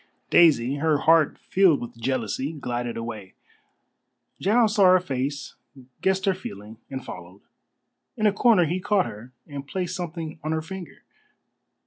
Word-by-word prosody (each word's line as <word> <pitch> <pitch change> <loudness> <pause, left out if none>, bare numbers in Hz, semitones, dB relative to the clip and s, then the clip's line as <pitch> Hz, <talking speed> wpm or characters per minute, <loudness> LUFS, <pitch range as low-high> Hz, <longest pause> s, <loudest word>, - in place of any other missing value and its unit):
Daisy, 140 -5 +5
her 155 0 +2
heart 160 0 +3
filled 185 -6 +3
with 120 0 -8
jealousy, 130 +3 -2
glided 120 -4 -4
away. 110 -4 -7 1.0
Giles 215 +2 +3
saw 205 -3 +4
her 185 0 +7
face, 140 -4 -4 0.5
guessed 190 0 +1
her 195 - +3
feeling, 110 - -9
and 130 -1 -6
followed. 90 +2 -10 0.8
In 215 - 0
a 210 - +4
corner 205 -4 +4
he 175 +4 -1
caught 205 -1 +1
her, 110 +5 -9
and 140 -2 -8
placed 180 +2 -3
something 165 -3 -6
on 155 +1 -1
her 160 - -1
finger. 190 0 -9
155 Hz, 145 wpm, -25 LUFS, 120-185 Hz, 1.0 s, her